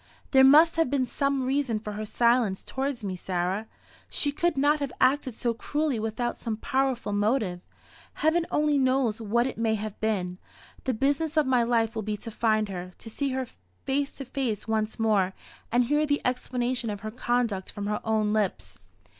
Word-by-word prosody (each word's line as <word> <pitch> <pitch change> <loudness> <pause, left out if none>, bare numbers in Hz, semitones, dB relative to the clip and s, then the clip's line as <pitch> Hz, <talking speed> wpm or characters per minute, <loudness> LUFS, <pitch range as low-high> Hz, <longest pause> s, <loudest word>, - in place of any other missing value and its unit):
"There 265 -1 +7
must 310 +5 +7
have 325 -5 +3
been 270 -2 +1
some 275 +1 0
reason 265 -4 0
for 210 -1 -6
her 215 +1 -4
silence 235 -4 +2
towards 265 -3 -3
me, 190 -2 -3
Sarah. 185 +4 -2 0.4
She 290 - 0
could 335 +1 0
not 290 +2 +3
have 280 -3 -3
acted 260 -2 +2
so 235 0 0
cruelly 290 +1 -1
without 225 +2 -2
some 225 -3 -3
powerful 260 -4 -1
motive. 205 -3 0 0.5
Heaven 330 +3 +1
only 300 -1 +2
knows 255 -4 +1
what 235 +3 +1
it 260 - -4
may 225 -1 +2
have 215 -1 -5
been. 185 -4 -1 0.5
The 260 -2 0
business 285 +6 0
of 305 - +4
my 255 -2 +3
life 230 -1 +1
will 220 - -3
be 210 0 -3
to 230 - -8
find 215 -1 +1
her 180 -1 -6
to 225 - -10
see 280 +4 -1
her 260 0 -1 0.4
face 275 +1 0
to 275 - -8
face 245 -6 -3
once 220 -1 -1
more, 205 -4 +2 0.4
and 245 +2 +4
hear 295 +5 +1
the 290 0 +2
explanation 250 -1 -1
of 205 -1 -5
her 215 - -5
conduct 235 -5 -1
from 205 -1 -5
her 210 +1 -1
own 215 -1 +1
lips." 210 -3 -2
240 Hz, 190 wpm, -27 LUFS, 215-275 Hz, 0.5 s, There